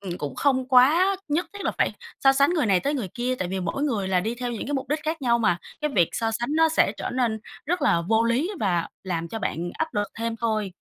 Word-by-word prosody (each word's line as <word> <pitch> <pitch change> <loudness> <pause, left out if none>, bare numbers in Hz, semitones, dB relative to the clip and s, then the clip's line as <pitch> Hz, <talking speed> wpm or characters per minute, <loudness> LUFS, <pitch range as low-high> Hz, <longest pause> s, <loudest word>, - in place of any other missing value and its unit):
ừm, 180 -3 -5
cũng 145 -1 -4
không 260 -2 +1
quá 315 +10 +5
nhất 310 +5 0
thiết 405 -1 -7
là - - 0
phải - - +2 0.3
so 270 - +8
sánh 280 +2 +3
người 320 -8 +1
này 190 -3 +3
tới 285 +2 -1
người 240 -9 -3
kia 250 +1 -1
tại 185 - -2
vì 190 +1 -2
mỗi 180 +10 -2
người 220 -10 0
là 185 -1 +2
đi 220 +5 -2
theo 245 0 -4
những 230 - -5
cái 290 - -2
mục 265 - -3
đích 300 +2 0
khác 315 -1 -2
nhau 235 -2 +3
mà. 190 -7 +2 0.2
Cái 300 - -1
việc 175 -3 +4
so 225 -1 -1
sánh 235 +2 -2
nó 325 0 +5
sẽ 320 - +2
trở - - -4
nên 240 -4 0 0.3
rất 350 +1 0
là 170 - +3
vô 225 +1 +3
lý 255 - +1
và 175 -5 0
làm 170 -3 -3
cho 225 - -5
bạn 175 -4 -3
áp 320 - 0
lực 205 -1 0
thêm 230 0 -2
thôi. 215 -4 -1
235 Hz, 270 wpm, -25 LUFS, 195-285 Hz, 0.3 s, so